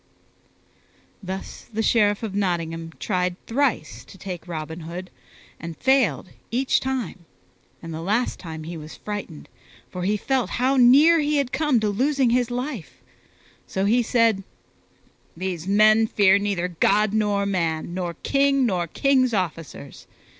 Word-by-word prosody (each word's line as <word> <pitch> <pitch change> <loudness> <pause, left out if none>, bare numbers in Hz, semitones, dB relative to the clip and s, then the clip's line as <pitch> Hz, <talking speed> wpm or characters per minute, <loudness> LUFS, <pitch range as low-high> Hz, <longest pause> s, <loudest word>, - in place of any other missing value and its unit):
Thus 190 0 -7
the 225 +1 -1
Sheriff 210 -2 +2
of 215 -3 -4
Nottingham 165 -4 -2
tried 180 -3 -1
thrice 270 +2 -1
to 195 - -14
take 185 -2 -7
Robin 160 -1 -5
Hood 175 +3 -7 0.5
and 165 0 -7
failed 250 - +2 0.2
each 255 +3 +1
time; 250 -10 -4 0.6
and 165 -1 -6
the 160 - -5
last 215 +8 -1
time 160 -3 -7
he 170 +2 -7
was 155 0 -9
frightened, 205 -7 -7 0.4
for 180 - -5
he 205 +4 +1
felt 265 +3 -1
how 260 +3 +2
near 280 +7 +6
he 300 0 +1
had 275 -3 0
come 280 -2 +2
to 215 - +1
losing 265 +4 +1
his 245 0 +2
life; 245 - -5 0.7
so 190 +1 -1
he 235 +4 +3
said, 230 -4 +2 0.9
"These 180 -2 -4
men 215 +2 +5
fear 200 -2 +4
neither 195 -3 -1
God 210 +1 +3
nor 205 -2 +1
man, 170 -4 -1
nor 175 -2 -3
king 275 -1 +2
nor 180 -6 0
king's 255 - +2
officers. 165 -6 -5
205 Hz, 145 wpm, -23 LUFS, 175-245 Hz, 0.9 s, near